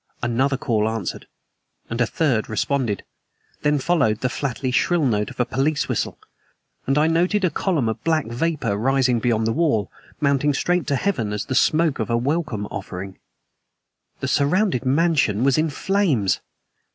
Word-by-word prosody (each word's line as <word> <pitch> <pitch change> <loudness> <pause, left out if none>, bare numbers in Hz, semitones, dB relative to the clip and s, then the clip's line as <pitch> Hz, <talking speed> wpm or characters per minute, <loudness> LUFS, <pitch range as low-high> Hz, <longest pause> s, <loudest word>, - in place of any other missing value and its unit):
Another 130 +3 +1
call 110 -5 0
answered, 110 -5 -4 0.6
and 115 +2 -3
a 120 - +3
third 130 -8 0
responded. 115 -1 -1 0.6
Then 150 0 +2
followed 135 -8 +1
the 125 - +1
flatly 130 0 -3
shrill 165 +4 +2
note 105 -4 0
of - - -13
a 125 - +3
police 140 +4 0
whistle, - - -2 0.7
and 135 +2 +2
I 150 - +4
noted 180 +5 +2
a 175 - +1
column 155 - 0
of 110 - -3
black 160 -2 +1
vapor 125 -1 -1
rising 130 +1 +2
beyond 115 -1 +1
the 115 - +1
wall, 145 -10 +1 0.3
mounting 140 0 +2
straight 175 +3 0
to 140 - +1
heaven 130 - -1
as 105 +1 -3
the - - -3
smoke 155 +2 +2
of 110 - -2
a 115 - +2
welcome 135 -5 -1
offering. 95 +1 -7 1.0
The - - -1
surrounded 145 - +1
mansion 135 -7 +2
was 135 +2 +3
in 160 +1 +1
flames! 150 - +1
135 Hz, 165 wpm, -22 LUFS, 115-155 Hz, 1.0 s, I